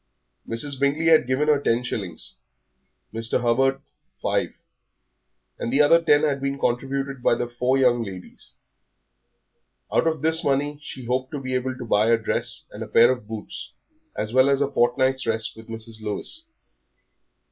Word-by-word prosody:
Mrs. 130 +4 -3
Bingley 140 +3 +1
had 160 -5 +5
given 130 +4 +1
her 150 -2 +4
ten 120 -2 +1
shillings, 95 -9 -5 0.8
Mr. 115 0 0
Hubert 135 +3 +2 0.4
five, - - 0 1.1
and 115 - -3
the 135 - +2
other 165 +3 +5
ten 150 -2 +4
had 140 -3 0
been 140 0 -2
contributed 135 +1 -2
by 120 - +3
the 120 - -3
four 125 +2 0
young 125 -3 +3
ladies. 95 -4 -10 1.4
Out - - +3
of 160 -3 -1
this 160 +1 +3
money 145 +1 0
she 130 -3 -8
hoped 130 +2 -1
to 145 - -3
be 130 -1 -5
able 130 0 -2
to 125 - -7
buy 105 -1 +2
a 115 - +5
dress 110 - -2
and - - -9
a - - -4
pair 120 +2 +5
of 125 -5 -5
boots, 110 +2 -7 0.4
as 110 +1 -3
well 130 +2 +5
as 140 -1 +2
a 140 -1 0
fortnight's 130 +2 +1
rest 110 -1 0
with 110 0 -13
Mrs. 115 0 -7
Lewis. 110 - -3
130 Hz, 170 wpm, -24 LUFS, 115-140 Hz, 1.4 s, had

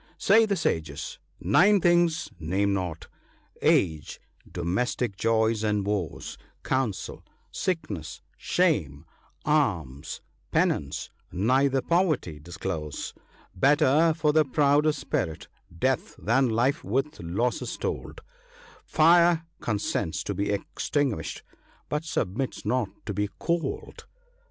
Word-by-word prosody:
— - - -30
" - - -33
Say 220 +2 +7
the 200 - +1
sages, 80 - -2 0.2
nine 195 - +5
things 175 -2 +3
name 95 +5 0
not: 90 -4 -3 0.5
Age, 80 -4 +1 0.3
domestic 100 +5 -1
joys 110 +1 +1
and 105 -2 +1
woes, 100 -7 -3 0.2
Counsel, 130 -7 -2 0.3
sickness, 110 - -3
shame, 85 - 0 0.4
alms, 85 - 0 0.3
penance; 70 -1 0 0.2
neither 130 +7 +2
poverty 155 - +1
disclose. 80 -1 -5 0.4
Better 150 - +4
for 150 -2 +2
the 155 0 +5
proud 145 +2 +3
of 155 - +2
spirit, 80 - -3 0.3
death, - - 0
than 125 +4 +2
life 130 +8 +1
with 135 +7 -1
losses 100 +9 -2
told; - - -4 0.6
Fire 170 +1 +4
consents 105 -6 -2
to - - -3
be 100 0 -1
extinguished, 125 +5 -2 0.5
but 150 +2 -2
submits 125 - -2
not 125 -5 +1 0.2
to 105 - -3
be 105 +1 -1
cold." 170 -1 -3
120 Hz, 110 wpm, -27 LUFS, 90-155 Hz, 0.6 s, Say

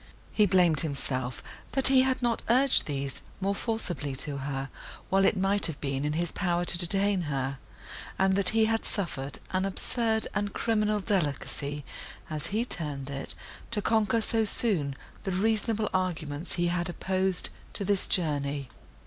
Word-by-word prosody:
He 210 -1 +3
blamed 175 -5 +4
himself, 130 -4 -3 0.3
that 270 0 +9
he 265 -1 +6
had 260 -1 0
not 235 -1 +1
urged 260 +3 +5
these 140 -2 -4 0.2
more 195 +1 0
forcibly 180 - -2
to 140 +1 -3
her, 135 0 -4 0.4
while 195 0 +4
it 205 - +3
might 195 +2 +2
have 160 -4 -6
been 135 -1 -2
in 150 - 0
his 170 +1 -1
power 175 -2 0
to 175 - +4
detain 195 +2 +3
her, 135 -1 -2 0.6
and 190 0 +3
that 195 -2 +5
he 220 0 +3
had 225 0 0
suffered 145 -8 -2
an 185 0 0
absurd 220 +3 0
and 205 -1 -2
criminal 215 -2 +1
delicacy, 145 -6 -1 0.5
as 155 -1 -2
he 220 +4 -1
termed 145 - -3
it, 135 0 -5 0.3
to 230 - -2
conquer 220 +1 +2
so 225 0 +1
soon 190 - 0 0.3
the 190 - -2
reasonable 215 +2 +1
arguments 165 -4 -2
he 175 -1 +1
had 175 0 -1
opposed 190 +1 0 0.2
to 200 - -3
this 200 -1 +1
journey. 145 -5 -1
185 Hz, 160 wpm, -28 LUFS, 145-210 Hz, 0.6 s, that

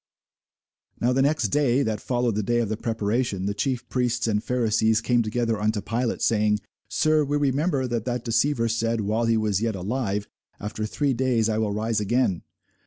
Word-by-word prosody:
Now 125 +2 +2
the 135 - +2
next 140 -5 +2
day, 140 +1 +2
that 110 -3 -2
followed 120 -2 0
the 105 - 0
day 120 +4 0
of 115 -3 0
the 110 - -1
preparation, 110 -2 -1
the 100 - 0
chief 125 +3 -2
priests 125 -2 0
and 105 -1 0
Pharisees 110 -3 +2
came 120 +1 +2
together 115 0 -1
unto 105 0 +1
Pilate, 115 +4 -2
saying, 105 -1 +2 0.3
Sir, 155 -1 +2
we 145 +1 0
remember 140 0 +1
that 120 -3 -2
that 125 -1 -3
deceiver 115 +1 +1
said, 115 0 0
while 110 +3 0
he 115 0 +2
was 105 -2 0
yet 115 -2 0
alive, 105 +1 -2 0.3
After 105 +1 -4
three 140 +4 0
days 120 -3 +1
I 110 0 0
will 110 -2 0
rise 110 +1 0
again. 105 -3 +1
115 Hz, 185 wpm, -25 LUFS, 110-125 Hz, 0.3 s, Now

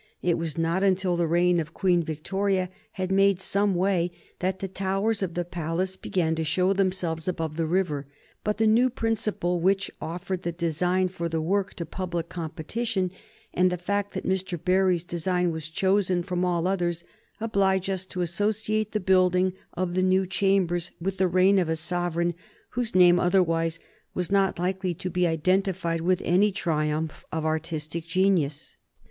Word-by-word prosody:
It 175 -1 +3
was 165 -2 -3
not 165 +3 +1
until 190 -2 +2
the 170 -1 +1
reign 175 +1 +3
of 165 0 -5
Queen 180 -3 +3
Victoria 185 +4 -1 0.2
had 185 -1 -3
made 195 -1 +4
some 200 0 +1
way 180 -1 +1 0.3
that 185 +1 -1
the 195 - -4
towers 195 +3 -1
of 180 -3 -2
the 175 0 -1
palace 175 +2 -2
began 170 -3 -1
to 160 0 -1
show 180 +5 +2
themselves 185 -4 -1
above 165 -4 -2
the 165 0 -1
river; 155 -5 0 0.4
but 210 0 -1
the 220 - +2
new 235 +4 +4
principle 220 -7 -1
which 195 +2 +1
offered 180 +2 -4
the 175 - -2
design 175 +2 0
for 170 -2 -4
the 165 0 -1
work 195 +4 0
to 170 - -4
public 175 0 -4
competition, 180 +4 -3 0.4
and 180 0 +3
the 180 - -1
fact 200 +3 -2
that - - -4
Mr. 190 -1 -1
Barry's 185 0 +2
design 180 0 0
was 160 -1 -5
chosen 185 0 +1
from 180 -1 -2
all 175 -2 +1
others, 175 -3 0 0.4
oblige 195 -4 +1
us 190 -1 -1
to 180 - -4
associate 215 +4 -1
the 215 - +1
building 185 -1 +3 0.2
of 180 -1 -2
the 185 - +1
new 185 +1 +3
chambers 185 -2 +1
with 190 +2 -3
the 190 - +4
reign 185 +2 +4
of 175 -3 0
a 160 - +1
sovereign 175 +1 -1 0.4
whose 240 -4 -2
name 175 -1 +7
otherwise 165 -3 +2 0.4
was 180 +1 -2
not 195 -1 +2
likely 185 0 -1
to 185 +3 -5
be 180 0 +2
identified 170 0 0
with 180 +1 +1
any 195 +4 +4
triumph 155 -4 -1
of 160 -1 -2
artistic 160 +1 -3
genius. 165 -5 +1
180 Hz, 170 wpm, -26 LUFS, 170-190 Hz, 0.4 s, name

